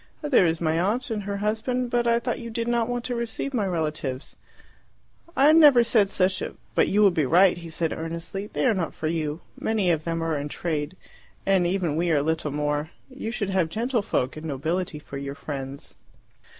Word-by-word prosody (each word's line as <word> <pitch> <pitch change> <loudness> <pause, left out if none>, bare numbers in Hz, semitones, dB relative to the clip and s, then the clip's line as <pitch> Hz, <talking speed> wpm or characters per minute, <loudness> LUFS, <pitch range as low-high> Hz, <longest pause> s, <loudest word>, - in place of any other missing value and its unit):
"There 265 - +4
is 165 0 0
my 160 -1 +1
aunt 225 +7 0
and 215 -2 -1
her 200 0 -4
husband; 240 +3 -1
but 240 -1 +1
I 235 0 +4
thought 235 - -3
you 235 -1 -7
did 230 +1 -3
not 235 -1 +1
want 245 -1 -2
to 250 - -2
receive 235 +3 -3
my 215 -6 0
relatives." 155 -6 -3 1.0
"I 280 +3 +7
never 295 -7 +7
said 220 -4 +3
such 185 0 +1
a - - -5
" - - -35
"But - - +3
you 210 +2 +3
would 195 -3 +5
be 155 -5 +1
right," 180 +5 +5
he 170 -1 -9
said 160 0 -1
earnestly. 170 +5 -5
"They - - -2
are 245 - +4
not 180 -5 -3
for - - -6
you. 155 0 -2 0.2
Many 210 -5 +1
of 160 -2 0
them 165 0 -2
are 165 -1 0
in 145 +1 -4
trade, 155 +2 -3 0.5
and 190 -3 +3
even 175 -4 0
we 170 +2 0
are 145 -3 +2
little 160 0 -1
more; 150 +1 -1 0.2
you 260 -4 -5
should 205 -4 -2
have 185 -4 +1
gentlefolk 220 - -1
and 155 +1 -6
nobility 160 +4 -2
for 140 -2 -8
your 140 0 -5
friends." 140 -2 -7
180 Hz, 210 wpm, -25 LUFS, 160-225 Hz, 1.0 s, I